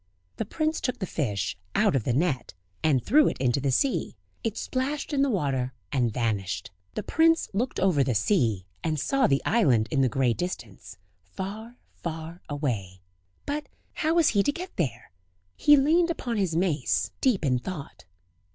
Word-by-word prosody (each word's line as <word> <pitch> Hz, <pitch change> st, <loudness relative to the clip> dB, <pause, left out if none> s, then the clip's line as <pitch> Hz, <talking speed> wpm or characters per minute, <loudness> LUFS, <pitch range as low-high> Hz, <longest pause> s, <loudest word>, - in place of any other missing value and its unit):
The 225 Hz, -, -2 dB
prince 310 Hz, +8 st, -1 dB
took 250 Hz, -, -1 dB
the 190 Hz, -, -3 dB
fish 105 Hz, -, -2 dB, 0.2 s
out -, -, +3 dB
of 125 Hz, -, 0 dB
the -, -, +1 dB
net, 135 Hz, -, 0 dB, 0.3 s
and 140 Hz, -6 st, +2 dB
threw 295 Hz, +5 st, +5 dB
it -, -, -1 dB
into 130 Hz, +1 st, +1 dB
the 140 Hz, -, +1 dB
sea; 260 Hz, -, 0 dB, 0.3 s
it 225 Hz, -1 st, -2 dB
splashed 280 Hz, +4 st, -2 dB
in 275 Hz, -, +2 dB
the 280 Hz, -, +3 dB
water, 135 Hz, -, 0 dB, 0.2 s
and 120 Hz, -4 st, +1 dB
vanished. 100 Hz, -6 st, -2 dB, 0.2 s
The -, -, -2 dB
prince 330 Hz, 0 st, +3 dB
looked 245 Hz, +6 st, -1 dB
over 180 Hz, -7 st, +3 dB
the 130 Hz, -3 st, 0 dB
sea, 110 Hz, -, +1 dB, 0.2 s
and 155 Hz, -2 st, 0 dB
saw 275 Hz, -, +2 dB
the 135 Hz, -, +1 dB
island 130 Hz, -, +3 dB
in 135 Hz, -, +2 dB
the 130 Hz, -, +3 dB
grey 125 Hz, 0 st, +2 dB
distance, 105 Hz, -, -6 dB, 0.2 s
far, 205 Hz, -, -7 dB, 0.2 s
far 165 Hz, +1 st, -6 dB
away; 110 Hz, -11 st, -3 dB, 0.4 s
but 295 Hz, +1 st, -3 dB, 0.2 s
how 320 Hz, 0 st, 0 dB
was 335 Hz, -3 st, +5 dB
he 205 Hz, -, +3 dB
to 285 Hz, -, +2 dB
get 360 Hz, +5 st, -7 dB
there? 135 Hz, -, -3 dB, 0.4 s
He 295 Hz, 0 st, +6 dB
leaned 325 Hz, +5 st, +4 dB
upon 245 Hz, -8 st, -2 dB
his 185 Hz, -5 st, 0 dB
mace, 130 Hz, -, +1 dB
deep 230 Hz, -, +2 dB
in 125 Hz, -2 st, +2 dB
thought. 155 Hz, -, -7 dB
160 Hz, 175 wpm, -27 LUFS, -, 0.4 s, He